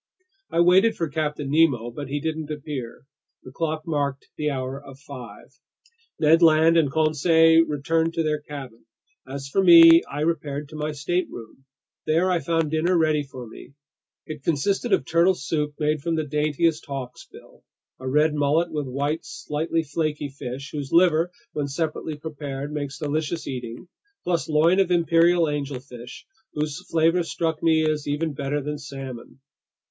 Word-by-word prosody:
I 170 - +2
waited 190 +6 +5
for 165 - -2
Captain 150 -1 -3
Nemo. 140 -7 +2
But 145 +3 -7
he 145 +2 -2
didn't 155 0 -4
appear. 145 -5 -6 0.4
The 130 - -11
clock 155 +2 -3
marked 145 -4 -2
the 150 0 -1
hour 135 0 -4
of 135 -1 -12
five. 130 -6 -12 0.6
Ned 160 +2 +4
Land 160 0 +5
and 155 -5 +3
Conseil 160 +1 +4
returned 160 +3 0
to 165 - +1
their 150 -1 0
cabin. 135 -6 -9 0.4
As 135 +1 -6
for 190 +8 +1
me, 165 -2 +9
I 145 - -4
repaired 150 -3 -2
to 155 - -11
my 150 0 -3
stateroom. 145 -5 -4 0.4
There 170 +4 +2
I 175 - +2
found 165 0 -1
dinner 170 +3 +2
ready 155 -2 +2
for 130 -3 -9
me. 120 +4 -13 0.5
It 155 -2 -8
consisted 195 - 0
of - - +2
turtle 170 +5 +3
soup 150 -1 -3
made 150 -1 0
from 165 +2 -1
the 155 -1 -1
daintiest 150 +2 0
hawksbill, 130 -3 -9 0.4
a 130 0 -4
red 150 +3 +3
mullet 150 +4 +1
with 150 -3 -3
white, 145 +5 -2
slightly 160 +2 -3
flaky 150 -1 -2
flesh, 135 +1 -7
whose 145 -3 -5
liver, 170 -1 +4 0.2
when 145 -1 -2
separately 155 +1 -3
prepared, 145 -2 -6
makes 145 -2 -4
delicious 155 +1 -2
eating, 125 +3 -6 0.4
plus 170 -2 -1
loin 165 +5 +3
of 190 -2 +3
imperial 170 0 +3
angelfish, 135 -5 -5 0.3
whose 150 +3 -3
flavor 165 +2 +3
struck 165 -1 -2
me 160 -1 +3
as 150 -1 -2
even 150 +2 -1
better 145 0 -2
than 150 +1 -4
salmon. 135 -2 -9
150 Hz, 160 wpm, -24 LUFS, 140-165 Hz, 0.6 s, me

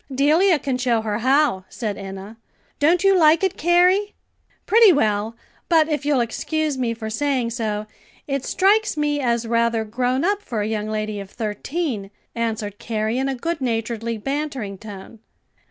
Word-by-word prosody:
"Delia 310 +7 +4
can 265 -2 -2
show 240 -3 +1
her 210 -1 -2
how," 260 -5 +2
said 215 -3 -4
Enna. 195 +2 -8 0.4
"Don't 335 +5 +3
you 390 0 +5
like 325 0 +5
it, 380 - +1
Carrie?" 360 +5 +3 0.5
"Pretty 445 -1 +6
well, 220 -6 0 0.3
but 320 -2 +4
if 295 -1 -2
you'll 285 -4 +3
excuse 305 +6 -2
me 240 -3 -1
for 220 -1 -6
saying 255 -1 0
so, 215 -2 -2 0.4
it 275 -2 -2
strikes 410 +2 +2
me 295 -1 0
as 235 -3 0
rather 230 -1 +1
grown 250 +6 -1
up 405 +1 +1
for 230 - -3
a - - -2
young 215 -1 -2
lady 215 -1 -3
of 195 -1 -8
thirteen," 220 - -3 0.2
answered 220 -3 -3
Carrie 220 +1 -2
in 270 +1 0
a 270 - -2
good 330 +4 -3
naturedly 230 -1 -2
bantering 270 -4 -3
tone. 210 +1 -10
245 Hz, 165 wpm, -22 LUFS, 220-305 Hz, 0.5 s, Pretty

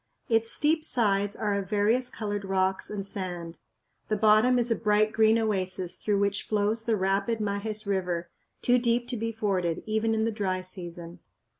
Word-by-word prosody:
Its 225 0 +3
steep 310 +4 +2
sides 205 -8 +2
are 210 -2 -1
of 200 -2 -3
various 220 +5 +2
colored 205 -3 -4
rocks 190 0 0
and 200 -2 -4
sand. 175 -4 -5 0.5
The 215 - 0
bottom 215 +4 +4
is 240 -1 0
a - - +4
bright 215 0 +2
green 220 0 +4
oasis 185 -5 -1
through 210 -2 -1
which 200 0 -1
flows 215 +2 0
the 230 - +2
rapid 195 +3 0
Majes 210 0 -3
River, 180 -3 -1 0.4
too 250 0 +4
deep 240 0 +1
to 250 - -2
be 230 0 -2
forded 190 -6 -1
even 220 +1 0
in 220 0 +1
the 230 - 0
dry 190 -4 -2
season. 175 -2 -7
210 Hz, 175 wpm, -27 LUFS, 190-225 Hz, 0.5 s, bottom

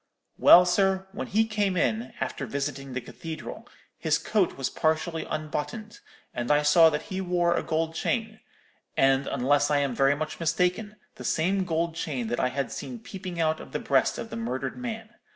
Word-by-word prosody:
Well, 180 +1 +9
sir, 190 +1 +2
when 205 - -5
he 220 +3 +2
came 205 -4 0
in, 120 -4 0
after 135 - -3
visiting 140 +1 -4
the 130 - -2
cathedral, 160 +6 -8 0.3
his - - +2
coat - - 0
was - - -1
partially 160 +1 -1
unbuttoned 155 +8 -4 0.3
and 120 0 -3
I 150 0 +4
saw 160 +2 +7
that 150 -1 -3
he 190 - -2
wore 175 -2 +1
a - - 0
gold 160 0 -1
chain, 220 +5 -2 0.6
and, 135 0 +3
unless 145 +3 +2
I 145 - +3
am 140 -3 0
very 135 +3 +3
much 155 +1 -5
mistaken, 180 +6 0 0.2
the - - -8
same 185 +4 +1
gold 165 -1 -1
chain 135 -8 -3
that 120 - -1
I - - +2
had 130 -3 -3
seen 245 - -6
peeping 190 -5 -7
out 160 -1 +1
of - - -11
the - - 0
breast - - +2
of - - -6
the - - -4
murdered 130 +4 -3
man. 225 -3 -6
160 Hz, 190 wpm, -27 LUFS, 140-190 Hz, 0.6 s, Well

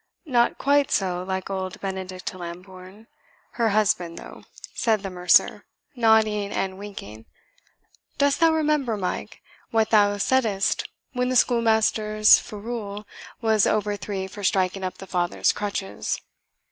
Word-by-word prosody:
"Not 240 -5 +2
quite 285 0 +2
so 180 -3 0
like 190 +1 -4
old 190 -1 -4
Benedict 190 -1 -5
Lambourne, 185 +3 -10 0.5
her 230 -2 +1
husband, 205 -5 +1
though," - - -11 0.3
said 220 -3 +1
the 195 - -4
mercer, 180 -1 +3 0.3
nodding 220 -3 +3
and 190 0 -3
winking. 110 - -9 0.9
"Dost 285 0 +2
thou 330 -1 +5
remember, 300 -7 +1
Mike, 185 -2 -5 0.3
what 225 -1 +1
thou 205 -2 +4
saidst 210 -3 +1 0.2
when 250 -1 0
the 255 - -1
schoolmaster's 220 -3 +4
ferule 210 -1 -6 0.4
was 220 -3 +3
over 210 -1 0
thee 195 -1 -4
for 200 +2 -9
striking 190 0 +1
up 185 - -4
thy 195 - -9
father's 175 -1 +1
crutches? 200 -1 -3
205 Hz, 130 wpm, -24 LUFS, 190-225 Hz, 0.9 s, thou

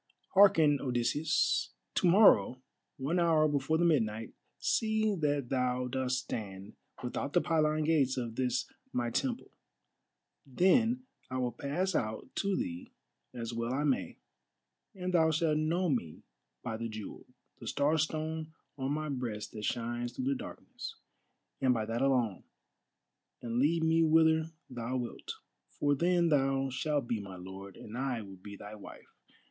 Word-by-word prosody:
Hearken, 160 -8 +6
Odysseus. 140 +6 +1 0.2
To 185 - +2
morrow, 185 - +6 0.4
one 150 +7 0
hour 160 -2 +4
before 145 +1 +1
the 175 - +2
midnight, 115 -9 +1 0.2
see 220 -1 +1
that 145 -7 0
thou 125 -1 0
dost 130 0 -1
stand 100 -2 -6 0.3
without 125 +3 -3
the 175 - +4
pylon 155 -2 +2
gates 145 -5 +2
of 120 -3 -3
this 125 0 0 0.3
my 120 -1 -1
temple; 250 - -2 0.9
then 225 - +3 0.3
I 130 - -3
will 125 -1 0
pass 150 +10 -2
out 110 -6 -2
to 200 -1 +1
thee 260 -1 -4 0.4
as 115 -1 -5
well 115 +1 -2
I 145 - 0
may, 140 -3 0 0.8
and 185 -1 -3
thou 160 -2 +5
shalt 155 -1 +2
know 170 +4 +1
me 115 - -2 0.4
by 110 - -3
the 115 0 -4
jewel, 110 -2 -8 0.3
the - - -9
Star 150 +3 +2
stone 155 +1 -2 0.3
on 135 +2 -1
my 155 +1 -2
breast 125 -7 -4
that 105 -1 -5
shines 120 0 -2
through 130 - -4
the 135 - +2
darkness, 135 - -8 0.7
and 130 -2 +4
by 110 -1 -1
that 115 +2 -2
alone, 125 -8 +1 1.0
and 120 0 -1
lead 160 +4 +3
me 160 +1 +4
whither 160 0 +4 0.2
thou 125 0 -3
wilt. 120 -2 -5 0.5
For 145 -1 +3
then 170 +3 +3
thou 135 -2 +2
shalt 145 0 -1
be 115 - -1
my 100 -2 -8
lord, 95 +2 -9
and 110 - -9
I 125 -3 -2
will 95 -1 -11
be 100 +2 -10
thy 105 +1 -9
wife. 105 -2 -12
135 Hz, 150 wpm, -32 LUFS, 120-160 Hz, 1.0 s, Hearken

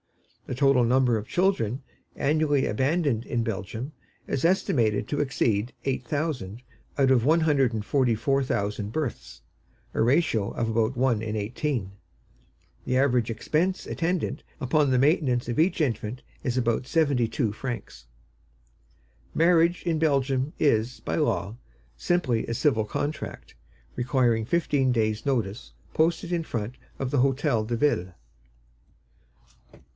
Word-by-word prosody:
The - - -3
total 135 -2 +4
number 125 0 +3
of 110 0 -4
children 145 - +1 0.3
annually 145 -1 +1
abandoned 130 0 0
in 120 - -1
Belgium 110 - -4 0.3
is 135 - -2
estimated 120 - +2
to 145 0 -1
exceed 120 -4 0
eight 135 -1 -1
thousand 135 - -3 0.4
out 135 -2 +3
of 125 -3 +4
one 160 +5 +4
hundred 140 -6 +3
and 110 -2 -4
forty 125 -3 +2
four 135 +5 +1
thousand 105 -3 -2
births, 150 -3 -4 0.5
a - - 0
ratio 115 -5 +2
of 115 - -2
about 115 +2 0
one 125 -4 +2
in 110 -1 -3
eighteen. 115 0 -2 0.9
The 130 - 0
average 125 -4 +2
expense 160 - -1
attendant 175 0 -2 0.2
upon 145 +1 +2
the 130 - +3
maintenance 135 -4 +2
of 120 - -3
each 175 +4 +2
infant 120 -4 -1 0.2
is 125 -1 -1
about 120 0 0
seventy 140 -8 +2
two 115 -3 -1
francs. 110 - -6 1.3
Marriage 170 +1 +3
in 165 -3 0
Belgium 135 -2 +1
is, 120 -4 +1
by - - -3
law, 100 +5 0 0.4
simply 130 -11 0
a 115 - -2
civil 115 -5 +2
contract, 145 +7 -5 0.4
requiring 120 -3 +1
fifteen 140 -3 +1
days' 110 -2 0
notice 115 -5 -2 0.2
posted 165 +2 +1
in 170 -1 0
front 115 -4 -4 0.2
of 135 -1 -2
the 145 - +2
Hôtel 130 -4 +1
de 120 - -1
Ville. 95 -10 +1
130 Hz, 135 wpm, -26 LUFS, 115-150 Hz, 1.3 s, total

